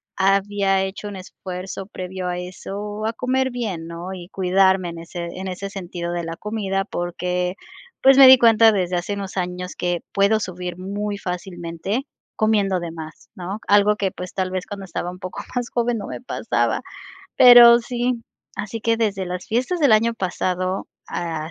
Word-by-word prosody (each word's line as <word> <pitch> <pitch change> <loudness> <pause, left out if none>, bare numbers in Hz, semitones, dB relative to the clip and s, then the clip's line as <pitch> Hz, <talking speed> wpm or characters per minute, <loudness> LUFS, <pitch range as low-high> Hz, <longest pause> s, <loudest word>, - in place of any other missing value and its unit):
Había 195 0 +2
hecho 195 +2 -5
un 205 - -7
esfuerzo 185 0 -7
previo 185 -1 -5
a 175 0 -2
eso 205 +4 -6
a 225 - -1
comer 260 +2 0
bien, 205 -10 -4
¿no?, 170 +3 -6
y 180 0 -9
cuidarme 190 -1 +2
en 165 0 -8
ese 170 +1 -6
en 190 +1 -6
ese 190 +2 -5
sentido 175 -2 -5
de 170 -1 -2
la 165 0 -5
comida 195 -3 -2
porque 180 +1 -2 0.5
pues 270 0 +7
me 270 -1 +10
di 260 0 +10
cuenta 225 -1 +6
desde 185 -3 0
hace 195 +4 -3
unos 195 -1 -6
años 180 0 -3
que 175 -1 -1
puedo 200 +2 +3
subir 180 -2 -5
muy 200 +2 -4
fácilmente 180 +5 -4 0.3
comiendo 205 -4 +2
de 170 -1 -5
más, 160 -1 -10
¿no? 190 +3 -5
Algo 205 +1 +5
que 195 -2 -1
pues 180 0 -8
tal 185 -1 -2
vez 185 -1 -3
cuando 200 -1 -7
estaba 175 0 -4
un 180 - -12
poco 185 -2 -6
más 245 -1 -1
joven 240 -1 0
no 205 - -6
me - - -6
pasaba. - - -1 0.6
Pero 240 -2 +10
sí, 240 0 -2 0.3
así 210 +2 -4
que 230 0 +1
desde 205 -4 0
las 180 0 -5
fiestas 255 +10 0
del 285 -6 +4
año 230 +2 +4
pasado 185 -1 -2 0.2
ha 160 -2 -3
195 Hz, 180 wpm, -22 LUFS, 180-215 Hz, 0.6 s, me